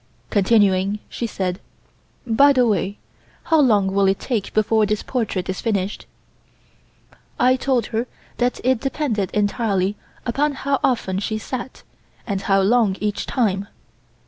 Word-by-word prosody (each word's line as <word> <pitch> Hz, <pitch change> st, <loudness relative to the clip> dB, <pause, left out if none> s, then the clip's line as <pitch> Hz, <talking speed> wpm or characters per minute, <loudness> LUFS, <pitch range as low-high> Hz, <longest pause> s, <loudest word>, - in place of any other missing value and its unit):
Continuing, 200 Hz, -1 st, +3 dB
she 235 Hz, -, -3 dB
said: 185 Hz, -4 st, -3 dB, 0.7 s
"By 275 Hz, +5 st, +5 dB
the 250 Hz, -2 st, +3 dB
way, 205 Hz, -2 st, 0 dB, 0.5 s
how 320 Hz, -1 st, +3 dB
long 210 Hz, -8 st, +3 dB
will 200 Hz, 0 st, +3 dB
it 195 Hz, 0 st, +2 dB
take 230 Hz, -6 st, -2 dB
before 215 Hz, 0 st, +3 dB
this 210 Hz, 0 st, -1 dB
portrait 215 Hz, -8 st, -2 dB
is 185 Hz, -, -3 dB
finished?" 200 Hz, -3 st, -2 dB, 1.3 s
I 255 Hz, +1 st, +5 dB
told 260 Hz, -2 st, 0 dB
her 230 Hz, +3 st, -1 dB, 0.3 s
that 245 Hz, 0 st, 0 dB
it 255 Hz, -1 st, +2 dB
depended 250 Hz, -, -1 dB
entirely 205 Hz, -2 st, 0 dB, 0.3 s
upon 285 Hz, +5 st, 0 dB
how 275 Hz, 0 st, -1 dB
often 195 Hz, -7 st, 0 dB
she 215 Hz, +2 st, -2 dB
sat, 250 Hz, +4 st, -6 dB, 0.4 s
and 200 Hz, -3 st, -2 dB
how 195 Hz, -1 st, +2 dB
long 205 Hz, -1 st, +3 dB
each 210 Hz, -1 st, -2 dB
time. 200 Hz, -6 st, 0 dB
215 Hz, 140 wpm, -21 LUFS, 195-250 Hz, 1.3 s, By